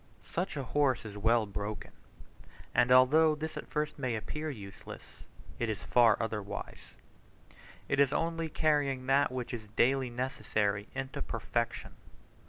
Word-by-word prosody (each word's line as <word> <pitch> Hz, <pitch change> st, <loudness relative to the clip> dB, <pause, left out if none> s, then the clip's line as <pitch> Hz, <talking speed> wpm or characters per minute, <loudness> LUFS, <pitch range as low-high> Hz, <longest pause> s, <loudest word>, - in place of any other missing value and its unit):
Such 175 Hz, -2 st, -3 dB
a 140 Hz, -, -2 dB
horse 130 Hz, -1 st, +1 dB
is 105 Hz, -1 st, -7 dB
well 115 Hz, +2 st, +3 dB
broken; 105 Hz, +1 st, -5 dB, 0.8 s
and 125 Hz, -, +3 dB
although 150 Hz, +5 st, +6 dB
this 160 Hz, +1 st, -5 dB
at -, -, -6 dB
first 150 Hz, -1 st, -2 dB
may 130 Hz, -4 st, -1 dB
appear 150 Hz, +8 st, -4 dB
useless, 100 Hz, -8 st, -9 dB, 0.6 s
it 120 Hz, -, 0 dB
is 110 Hz, -, -1 dB
far 115 Hz, +3 st, +5 dB
otherwise. 105 Hz, -3 st, -5 dB, 0.9 s
It 140 Hz, -, 0 dB
is 140 Hz, -1 st, +5 dB
only 165 Hz, 0 st, -1 dB
carrying 145 Hz, -4 st, +1 dB
that 135 Hz, +1 st, +3 dB
which 125 Hz, -1 st, -4 dB
is 110 Hz, -3 st, -6 dB
daily 130 Hz, +1 st, +3 dB
necessary 110 Hz, -5 st, -1 dB
into 135 Hz, 0 st, -4 dB
perfection. 115 Hz, +1 st, -3 dB
130 Hz, 140 wpm, -31 LUFS, 110-145 Hz, 0.9 s, although